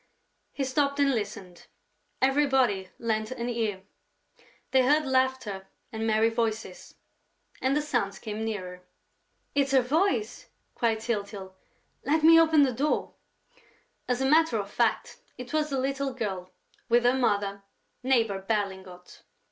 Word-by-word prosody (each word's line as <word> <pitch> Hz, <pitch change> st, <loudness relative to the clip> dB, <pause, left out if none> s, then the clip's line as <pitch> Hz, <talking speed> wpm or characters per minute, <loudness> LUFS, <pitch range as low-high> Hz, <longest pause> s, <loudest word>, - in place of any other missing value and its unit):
He 280 Hz, -, -3 dB
stopped 280 Hz, +2 st, 0 dB
and 280 Hz, -1 st, +3 dB
listened. 200 Hz, -5 st, -6 dB, 0.6 s
Everybody 265 Hz, -8 st, +2 dB
lent 220 Hz, -2 st, -2 dB
an 240 Hz, -2 st, -4 dB
ear. 220 Hz, -5 st, -2 dB, 0.9 s
They 265 Hz, -, +5 dB
heard 295 Hz, +4 st, +3 dB
laughter 260 Hz, -7 st, 0 dB, 0.2 s
and 220 Hz, 0 st, -3 dB
merry 220 Hz, +1 st, +3 dB
voices; 225 Hz, -4 st, -3 dB, 0.7 s
and 265 Hz, +2 st, +1 dB
the 300 Hz, -, 0 dB
sounds 240 Hz, -9 st, -1 dB
came 215 Hz, 0 st, -5 dB
nearer. 185 Hz, -5 st, -5 dB, 0.7 s
"It's 275 Hz, -1 st, +1 dB
her 265 Hz, -, +6 dB
voice!" 250 Hz, -, 0 dB, 0.2 s
cried 225 Hz, -2 st, 0 dB
Tyltyl. 200 Hz, -4 st, -4 dB, 0.5 s
"Let 305 Hz, +3 st, +1 dB
me 330 Hz, +1 st, +8 dB
open 320 Hz, -2 st, +5 dB
the 260 Hz, -2 st, +1 dB
door!" 290 Hz, +6 st, -1 dB, 0.9 s
As 250 Hz, +1 st, 0 dB
a -, -, +1 dB
matter 310 Hz, -3 st, +4 dB
of 200 Hz, -1 st, -4 dB
fact, -, -, 0 dB, 0.2 s
it 250 Hz, +1 st, -9 dB
was 305 Hz, -1 st, +1 dB
the 275 Hz, -, -2 dB
little 270 Hz, 0 st, -2 dB
girl, 190 Hz, -6 st, -4 dB, 0.4 s
with 240 Hz, +1 st, +4 dB
her 245 Hz, +1 st, +4 dB
mother, 205 Hz, -6 st, 0 dB, 0.4 s
Neighbor 230 Hz, -6 st, +1 dB
Berlingot. 190 Hz, -3 st, -4 dB
235 Hz, 135 wpm, -27 LUFS, 205-270 Hz, 0.9 s, me